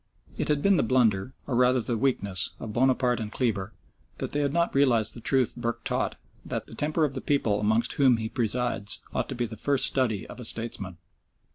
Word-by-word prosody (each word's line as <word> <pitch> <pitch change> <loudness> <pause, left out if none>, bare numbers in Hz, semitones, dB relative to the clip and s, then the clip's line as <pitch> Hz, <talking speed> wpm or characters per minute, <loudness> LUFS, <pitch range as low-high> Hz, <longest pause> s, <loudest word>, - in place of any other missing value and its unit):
It - - -2
had 150 -1 0
been 200 -2 +4
the - - +3
blunder, 115 -2 +1
or 130 - -2
rather 125 +1 +4
the 120 0 -2
weakness, 100 -7 +1
of 110 -2 -6
Bonaparte 125 0 +2
and 110 -1 -5
Kleber, 110 -6 -1 0.5
that - - -4
they 145 - -1
had 140 -1 +1
not 170 +2 +1
realised 125 -6 +2
the 120 - -10
truth 130 0 +2
Burke 120 -1 -3
taught, - - -1 0.3
that - - -4
"The - - -13
temper 155 +1 0
of 140 - -3
the 130 - -5
people 115 -8 +1
amongst 110 +3 +1
whom 130 -4 +4
he 110 -1 -3
presides 120 -3 0
ought - - -2
to - - -4
be 120 0 -1
the 110 -1 -8
first 140 +4 +2
study 120 -7 +1
of - - -10
a 125 - -7
statesman." 105 -6 -2
120 Hz, 215 wpm, -27 LUFS, 110-135 Hz, 0.5 s, been